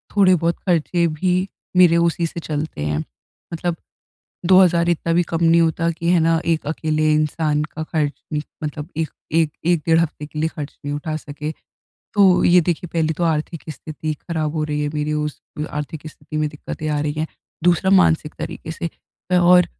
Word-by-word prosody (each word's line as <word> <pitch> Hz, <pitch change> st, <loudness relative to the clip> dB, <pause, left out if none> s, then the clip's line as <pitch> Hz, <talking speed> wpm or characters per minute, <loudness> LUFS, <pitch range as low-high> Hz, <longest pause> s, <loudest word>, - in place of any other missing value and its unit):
थोड़े 190 Hz, -2 st, +6 dB
बहुत 170 Hz, 0 st, 0 dB
खर्चे 170 Hz, -1 st, +2 dB
भी, 180 Hz, +4 st, 0 dB, 0.3 s
मेरे 175 Hz, -2 st, +7 dB
उसी 170 Hz, 0 st, +2 dB
से 170 Hz, -, -6 dB
चलते 155 Hz, -, -4 dB
हैं। 75 Hz, 0 st, 0 dB, 0.5 s
मतलब 170 Hz, +1 st, -1 dB, 0.7 s
2000 175 Hz, -2 st, +5 dB
इतना 170 Hz, -1 st, +1 dB
भी 175 Hz, +1 st, +4 dB
कम 170 Hz, 0 st, 0 dB
नहीं 165 Hz, +1 st, +5 dB
होता 165 Hz, 0 st, +2 dB
कि 170 Hz, +1 st, -3 dB
है 175 Hz, -, +4 dB
ना, 165 Hz, 0 st, +3 dB
एक 165 Hz, -3 st, 0 dB
अकेले 155 Hz, 0 st, +1 dB
इंसान 150 Hz, 0 st, +1 dB
का 155 Hz, +1 st, -6 dB
खर्च, 155 Hz, -2 st, -1 dB, 0.5 s
मतलब 150 Hz, 0 st, -4 dB
एक 160 Hz, -1 st, 0 dB, 0.2 s
एक 160 Hz, -1 st, +3 dB, 0.2 s
एक 175 Hz, -2 st, +3 dB
डेढ़ 165 Hz, -1 st, +5 dB
हफ्ते 155 Hz, -2 st, -2 dB
के 150 Hz, -, -9 dB
लिए 160 Hz, +1 st, +1 dB
ख़र्च 150 Hz, -3 st, -8 dB
नहीं 145 Hz, 0 st, -2 dB
उठा 155 Hz, +1 st, -3 dB
सके। 150 Hz, 0 st, -6 dB, 0.6 s
तो 195 Hz, -3 st, +5 dB
ये 180 Hz, +1 st, +6 dB
देखिए 175 Hz, +1 st, -2 dB
पहली 160 Hz, -1 st, +1 dB
तो 175 Hz, -, +1 dB
आर्थिक 160 Hz, 0 st, -1 dB
स्थिति 155 Hz, 0 st, -5 dB
ख़राब 155 Hz, -3 st, -2 dB
हो 155 Hz, -, 0 dB
रही 150 Hz, -1 st, -2 dB
है 150 Hz, -, 0 dB
मेरी, 150 Hz, 0 st, -1 dB
उस 150 Hz, -1 st, -2 dB, 0.3 s
आर्थिक 150 Hz, +1 st, -5 dB
स्थिति 155 Hz, 0 st, -8 dB
में 155 Hz, 0 st, +1 dB
दिक्कतें 150 Hz, +1 st, -6 dB
आ 150 Hz, -1 st, 0 dB
रही 150 Hz, 0 st, -1 dB
हैं। 155 Hz, -, 0 dB, 0.4 s
दूसरा 175 Hz, +2 st, +3 dB
मानसिक 160 Hz, -5 st, +4 dB
तरीके 165 Hz, 0 st, -6 dB
से 170 Hz, +1 st, -3 dB, 0.5 s
और 180 Hz, 0 st, +6 dB
160 Hz, 185 wpm, -21 LUFS, 150-170 Hz, 0.7 s, मेरे